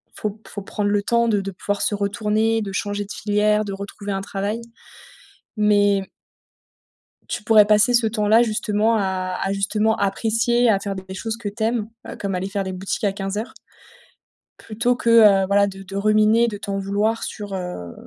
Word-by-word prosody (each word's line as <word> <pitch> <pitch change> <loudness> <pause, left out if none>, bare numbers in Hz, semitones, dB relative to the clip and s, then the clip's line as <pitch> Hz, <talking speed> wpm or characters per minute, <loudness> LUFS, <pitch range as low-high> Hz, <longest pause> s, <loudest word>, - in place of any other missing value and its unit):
faut 210 - -3
p 215 +2 -19
faut 205 - -6
prendre 205 +1 -2
le 205 0 +1
temps 235 +2 +2
de 210 -3 +1
de 195 0 -5
pouvoir 205 +2 -3
se 210 - +1
retourner, 215 +2 0
de 200 -2 -4
changer 205 +1 -3
de 200 - -11
filière, 210 +1 +1
de 200 - -5
retrouver 200 +1 -6
un 195 0 -2
travail. 205 +3 -3 1.0
Mais 205 -2 +3 1.2
tu - - -4
pourrais 215 -1 +6
passer, 210 +3 +4
ce 235 -2 +3
temps-là, 215 +1 +3
justement 220 -1 +1
à 185 -3 -2
à 195 - -1
justement 210 +3 0
apprécier, 225 +4 +1
à 200 -3 +3
faire 195 0 -4
des 190 0 -8
choses 220 +3 -4
que 220 -3 -4
tu 220 +2 -5
aimes, 225 -1 -1 0.2
heu, - - -7
comme 200 -2 -3
aller 185 +1 -2
faire 200 0 -2
des 190 - -4
boutiques 185 +3 -4
à 200 - +2
15:00 200 +4 -4 1.1
plutôt 230 +3 -1
que, 235 - -1 0.3
heu, - - 0
voilà 200 +1 +3
de 195 0 -8
de 195 +1 -9
ruminer, 215 +3 +3
de 210 -3 -4
t'en 200 -1 -4
vouloir 205 +3 -1
sur, 205 -2 -6
heu, 180 - -5
205 Hz, 190 wpm, -22 LUFS, 195-220 Hz, 1.2 s, pourrais